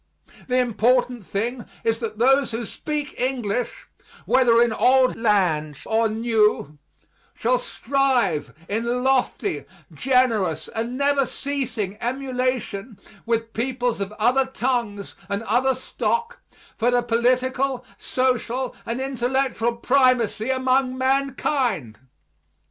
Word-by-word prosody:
The 250 0 +1
important 245 -1 +1
thing 235 +4 -2 0.2
is 225 0 +1
that 215 -2 -4
those 270 +3 +4
who 230 +1 -4
speak 295 +6 -4
English, 250 - -2 0.4
whether 240 -3 +4
in 235 -1 +3
old 255 +3 +4
lands 175 - +1
or 225 0 +2
new, 215 -9 +1 0.6
shall - - +1
strive 265 - 0 0.2
in 235 +4 -1
lofty, 265 -1 0 0.3
generous 225 - +1
and 235 +3 -4
never 280 -1 +2
ceasing 235 -9 -3
emulation 250 -4 -2 0.3
with 230 -1 -1
peoples 245 -2 -1
of 200 +1 -3
other 250 +5 +2
tongues 235 -6 -2 0.2
and 200 +2 -2
other 250 +5 +2
stock 465 - -2 0.4
for 240 +1 +1
the 245 0 +2
political, 255 +2 +1
social, 255 0 -1
and 230 +2 -2
intellectual 255 -2 0
primacy 250 -3 +2
among 260 0 +1
mankind. 260 - 0
245 Hz, 110 wpm, -23 LUFS, 225-260 Hz, 0.6 s, those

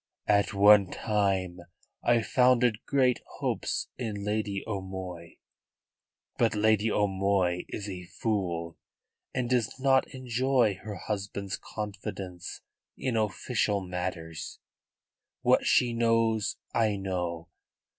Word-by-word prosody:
"At 100 -1 +3
one 100 -1 +6
time 95 -4 0 0.4
I 120 -1 +3
founded 125 -2 +3
great 130 -3 +3 0.2
hopes - - -1
in 105 -5 -3
Lady 105 -2 -1
O'Moy. 95 -4 -6 1.0
But 115 -2 +3
Lady 110 +1 +3
O'Moy 95 -3 +1
is 105 - -5
a 90 -2 -6
fool, 85 -5 -2 0.5
and 130 -2 -1
does 125 -1 0
not 130 0 +4
enjoy 125 -4 +1
her 105 -2 -6
husband's 100 -1 -4
confidence 95 -4 -6 0.4
in 130 -3 -1
official 105 0 0
matters. 90 -3 -5 0.9
What - - +4
she 120 -2 +4
knows 115 -2 +2 0.2
I 110 -3 +2
know. 90 -4 -3
105 Hz, 105 wpm, -29 LUFS, 95-115 Hz, 1.0 s, one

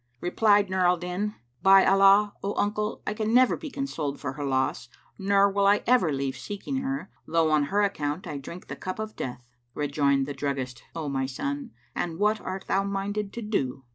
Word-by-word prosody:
Replied 205 - +3
Nur 190 0 -2
al 180 0 +3
Din, 180 +5 -3 0.3
"By 195 0 +7
Allah, 195 +1 +5
O 200 +1 -2
uncle, 210 +1 -1
I 210 - -1
can 215 +2 0
never 255 0 +5
be 310 -1 -7
consoled 165 - -3
for 130 -2 -4
her 145 +1 -5
loss 130 -2 -1 0.3
nor 200 0 +4
will 200 0 +2
I 205 +1 +4
ever 240 -10 +4
leave 135 -1 -2
seeking 205 - -5
her, 270 -4 -3 0.2
though 165 -1 +2
on 150 -1 +3
her 200 +8 +1
account 150 -3 -2
I 150 -5 -5
drink 170 +6 -9
the - - -7
cup 185 0 -5
of 215 0 -5
death!" 125 -1 -6 0.3
Rejoined 140 -2 +1
the 145 - -5
druggist, 135 -3 -3
"O 160 -3 -3
my 135 -1 -1
son, 280 - -4 0.2
and 165 -2 -3
what 210 +2 +2
art 190 +1 -5
thou 195 - +1
minded 200 +1 -2
to 235 - -5
do?" 135 - -2
195 Hz, 200 wpm, -27 LUFS, 145-210 Hz, 0.3 s, By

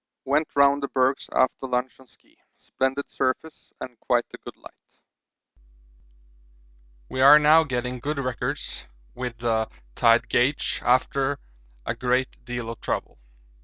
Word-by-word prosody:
Went 150 +4 0
round 140 0 +4
the 140 - -2
bergs 130 0 0
after 130 +1 +1
lunch 125 +1 -2
on 130 - -18
ski - - -29 0.2
splendid 135 +2 -2
surface 135 +4 -3
and 125 -3 -9
quite 120 0 +1
a - - -9
good - - -11
light. - - -16 2.3
We 130 - -3
are 140 +3 +9
now 150 +2 +6
getting 125 -3 -3
good 150 +4 -3
records 130 - -4 0.3
with 125 -2 -5
the 115 -2 0 0.2
tide 115 - +3
gauge 125 +4 0
after 135 +2 +1 0.5
a - - -1
great 125 +1 -1
deal 120 -2 -4
of 115 - -11
trouble. - - -4
130 Hz, 135 wpm, -24 LUFS, 125-140 Hz, 2.3 s, are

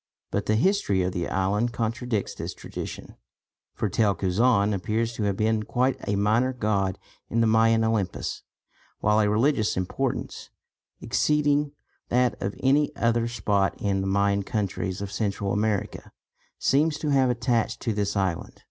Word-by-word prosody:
But 100 - -2
the 110 - +3
history 115 - +2
of 90 - -1
the 90 -1 -3
island 105 +5 0
contradicts 115 -2 -2
this - - -6
tradition, - - -8 0.6
for - - -1
Tel 100 +1 +2
Cuzaan 100 +3 +2
appears 110 +4 -1
to 115 - -3
have 100 -1 0
been 110 0 +1
quite 125 +4 0
a 100 - +1
minor 110 +6 +2
god 100 -5 0 0.3
in 115 - 0
the 115 - +4
Mayan 115 0 +4
Olympus; 110 -5 -1 0.6
while 105 +1 +3
a 105 -1 +3
religious 110 0 +2
importance, 95 -1 -3 0.5
exceeding 145 -1 +1 0.4
that 125 -2 +3
of 100 +1 -2
any 140 +3 +4
other 115 0 +1
spot 100 -5 0
in 100 -1 0
the 95 - -2
Mayan 100 +1 +2
countries 95 -2 -3
of 100 - -6
Central 100 -1 -2
America, 105 -1 -2 0.5
seems 150 +3 +2
to 150 - -3
have 135 -2 +3
attached 120 -1 0
to 115 - -1
this 105 0 -1
island. 95 -4 -2
110 Hz, 155 wpm, -26 LUFS, 100-120 Hz, 0.6 s, the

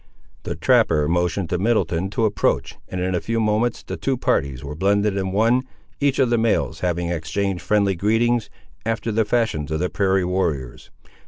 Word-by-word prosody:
The - - -4
trapper 75 -2 +3
motioned 90 +2 0
to 90 - 0
Middleton 95 -4 +1
to 110 +2 0
approach, 105 -3 0
and 95 - -4
in 90 +1 -1
a 90 - 0
few 115 0 -1
moments 110 +2 0
the - - -6
two 135 -1 -1
parties 70 - 0
were 70 +1 -5
blended 100 +4 +1
in 95 -1 -2
one, 115 +6 +3 0.4
each 140 -2 +1
of 130 -3 +2
the 120 - +3
males 115 -1 0
having 85 -1 -1
exchanged 85 +3 -2
friendly 100 -2 +2
greetings, 115 +5 +1 0.3
after 115 +1 -2
the 110 +1 +1
fashions 105 -10 0
of 80 0 -1
the 90 +1 -1
prairie 95 -2 +1
warriors. 80 -9 -2
100 Hz, 180 wpm, -22 LUFS, 85-115 Hz, 0.4 s, trapper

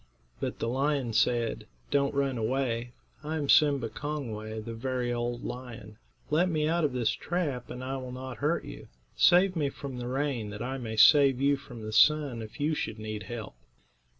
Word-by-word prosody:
But - - -3
the - - -2
lion 135 -1 0
said: 115 +1 +1 0.2
"Don't 140 0 +2
run 140 -2 +1
away; 120 0 -1 0.3
I 155 +2 -2
am 145 -2 -2
Sim'ba 140 -5 +4
Kong'way, 110 -7 -5
the 115 +1 -6
very 125 +1 -2
old 120 0 -3
lion. 115 -4 -8 0.3
Let 170 +5 +3
me 155 -2 +1
out 170 +1 +1
of 150 - +2
this 120 -3 +1
trap, 150 -9 -3
and 125 - -6
I 135 +1 -3
will 130 -1 -6
not 130 0 -7
hurt 150 +4 0
you. - - -9 0.3
Save 180 +2 +5
me 145 -4 +1
from 135 -2 -7
the 120 - -4
rain, 130 -4 -1
that 105 0 -6
I 135 +2 -3
may 110 -3 -5
save 135 +2 +7
you 140 +1 +3
from 125 -5 -10
the 110 0 -5
sun 145 -1 +4
if 110 +4 -10
you 150 +2 +1
should 115 -7 -3
need 110 -1 -5
help." 115 - -6
130 Hz, 190 wpm, -29 LUFS, 115-145 Hz, 0.3 s, save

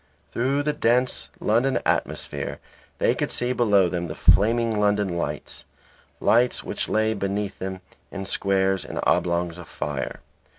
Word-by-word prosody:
Through 135 +4 0
the 150 0 0
dense 125 -2 +1
London 120 +5 +2
atmosphere - - -2 0.4
they - - +3
could - - -2
see 125 +1 0
below 105 -7 +4
them 85 -1 -3
the 75 - -6
flaming 115 +1 +3
London 105 -3 +1
lights; 75 -4 -4 0.6
lights 120 +2 +3
which - - -3
lay 110 0 +2
beneath 100 0 -3
them 95 0 -5 0.3
in 95 -1 -6
squares 95 -1 +1
and - - -6
oblongs 85 0 +1
of 85 - -10
fire. 70 -3 -4
100 Hz, 140 wpm, -24 LUFS, 90-120 Hz, 0.6 s, below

